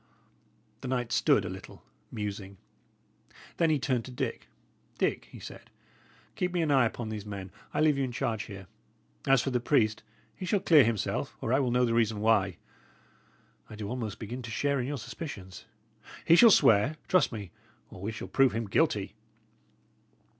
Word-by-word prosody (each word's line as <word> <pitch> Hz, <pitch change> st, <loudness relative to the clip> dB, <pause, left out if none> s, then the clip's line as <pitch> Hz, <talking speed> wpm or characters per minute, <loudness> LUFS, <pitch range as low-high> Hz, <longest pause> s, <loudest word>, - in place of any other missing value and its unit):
The -, -, -5 dB
knight 125 Hz, -2 st, -2 dB
stood -, -, +3 dB
a -, -, -3 dB
little, -, -, -10 dB, 0.3 s
musing. 100 Hz, -3 st, -5 dB, 1.0 s
Then 165 Hz, -, +3 dB
he 155 Hz, -, +3 dB
turned 130 Hz, -3 st, -1 dB
to 130 Hz, -, -9 dB
Dick. 125 Hz, -, -4 dB, 0.5 s
"Dick," -, -, 0 dB
he -, -, -13 dB
said, -, -, -11 dB, 0.7 s
"keep 180 Hz, 0 st, -1 dB
me 175 Hz, -2 st, +1 dB
an 155 Hz, -, 0 dB
eye 130 Hz, -4 st, +5 dB
upon 110 Hz, 0 st, -6 dB
these 105 Hz, -2 st, -5 dB
men; 100 Hz, -2 st, -7 dB, 0.2 s
I -, -, -1 dB
leave 150 Hz, -3 st, +3 dB
you -, -, +1 dB
in 130 Hz, -, -2 dB
charge 115 Hz, -2 st, -2 dB
here. 95 Hz, -3 st, -9 dB, 0.6 s
As 135 Hz, -3 st, +5 dB
for 135 Hz, -, -2 dB
the 125 Hz, -, +1 dB
priest, 115 Hz, -4 st, +2 dB, 0.3 s
he -, -, -9 dB
shall 200 Hz, +2 st, +1 dB
clear 160 Hz, -6 st, +6 dB
himself, 115 Hz, -3 st, -2 dB
or 115 Hz, -, -1 dB
I 135 Hz, -, +4 dB
will 130 Hz, -3 st, +1 dB
know 125 Hz, +1 st, +3 dB
the 115 Hz, -, 0 dB
reason 110 Hz, -2 st, +1 dB
why. 105 Hz, -5 st, +2 dB, 1.1 s
I 110 Hz, -, -9 dB
do 105 Hz, -1 st, -6 dB
almost 115 Hz, -4 st, -4 dB
begin 120 Hz, +3 st, -6 dB
to 120 Hz, -, -8 dB
share 140 Hz, +5 st, 0 dB
in 125 Hz, -, -2 dB
your 145 Hz, 0 st, -3 dB
suspicions. 115 Hz, -, -8 dB, 0.6 s
He 165 Hz, -, +7 dB
shall 230 Hz, +6 st, +8 dB
swear, 130 Hz, -, +5 dB
trust 185 Hz, -, +3 dB
me, 105 Hz, -6 st, -7 dB, 0.4 s
or -, -, -11 dB
we 105 Hz, +3 st, -3 dB
shall 110 Hz, -, -7 dB
prove 135 Hz, -2 st, +3 dB
him 115 Hz, +1 st, -2 dB
guilty." 100 Hz, -, +1 dB
120 Hz, 180 wpm, -29 LUFS, 105-135 Hz, 1.1 s, shall